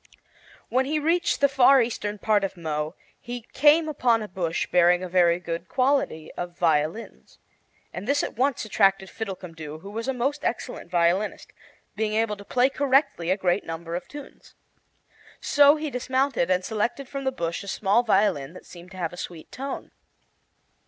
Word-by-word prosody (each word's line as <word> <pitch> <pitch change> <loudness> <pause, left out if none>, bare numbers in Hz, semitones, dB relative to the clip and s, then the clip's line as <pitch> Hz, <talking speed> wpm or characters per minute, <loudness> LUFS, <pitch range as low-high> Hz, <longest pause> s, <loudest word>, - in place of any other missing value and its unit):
When 260 +1 +2
he 305 +2 0
reached 330 +2 +1
the 280 - +6
far 270 0 +5
eastern 215 -3 -2
part 210 0 +1
of 195 -1 -3
Mo 155 0 -3 0.2
he 240 0 -7
came 305 +3 +5
on 240 -7 +1
a - - -6
bush 175 -3 -2
bearing 180 0 +4
a - - -3
very 175 -1 +3
good 170 0 -5
quality 255 - 0
of 175 -1 -6
violins, 160 +5 -1 0.6
and 185 +4 -6
this 285 +1 +2
at - - -4
once 255 0 0
attracted 195 -2 +2
Fiddlecumdoo, 165 -7 -7
who 200 - -9
was 225 +3 -5
a 265 - 0
most 275 +4 -1
excellent 230 - -4
violinist, 175 +4 0 0.4
being 215 0 -1
able 220 -1 +1
to 200 - -11
play 250 +5 +2
correctly 275 - +1
a 190 - +2
great 185 0 +1
number 165 +1 -6
of 175 +1 -4
tunes. 290 -1 -12 0.8
So 290 0 +5
he 305 -1 -4
dismounted 260 -6 0
and 185 0 +1
selected 235 +5 -2
from 275 +1 -5
the 265 - 0
bush 170 -9 -3
a - - -11
small 200 +3 +2
violin 190 - +1
that - - -13
seemed 175 0 -13
to - - -11
have 170 -2 -3
a - - -9
sweet 170 -3 -8
tone. 270 +1 -6
205 Hz, 175 wpm, -25 LUFS, 175-265 Hz, 0.8 s, the